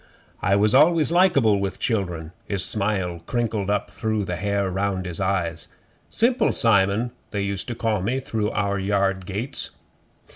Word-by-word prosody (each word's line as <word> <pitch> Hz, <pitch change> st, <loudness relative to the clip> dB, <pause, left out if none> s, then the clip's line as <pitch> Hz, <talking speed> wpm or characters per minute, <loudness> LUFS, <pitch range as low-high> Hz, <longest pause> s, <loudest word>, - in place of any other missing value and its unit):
'I 95 Hz, +2 st, +2 dB
was 105 Hz, +1 st, +3 dB
always 160 Hz, +4 st, +4 dB
likeable 140 Hz, -, +4 dB
with 100 Hz, 0 st, -3 dB
children.' 90 Hz, -8 st, -2 dB, 0.2 s
His 100 Hz, -2 st, +3 dB
smile 100 Hz, -5 st, 0 dB
crinkled 110 Hz, -5 st, -1 dB
up 105 Hz, 0 st, -1 dB
through 110 Hz, 0 st, -2 dB
the 90 Hz, -, -3 dB
hair 100 Hz, 0 st, -1 dB
round 95 Hz, 0 st, -2 dB
his 90 Hz, 0 st, -3 dB
eyes. 90 Hz, -4 st, -1 dB, 0.4 s
'Simple 245 Hz, +2 st, +2 dB
Simon 110 Hz, +2 st, +3 dB, 0.2 s
they 100 Hz, -2 st, -2 dB
used 100 Hz, -1 st, -3 dB
to 120 Hz, -, -4 dB
call 110 Hz, -4 st, -1 dB
me 120 Hz, +8 st, -1 dB
through 110 Hz, -5 st, -2 dB
our 100 Hz, -1 st, -1 dB
yard 95 Hz, -1 st, 0 dB
gates. 115 Hz, +8 st, -2 dB
100 Hz, 155 wpm, -23 LUFS, 95-115 Hz, 0.4 s, always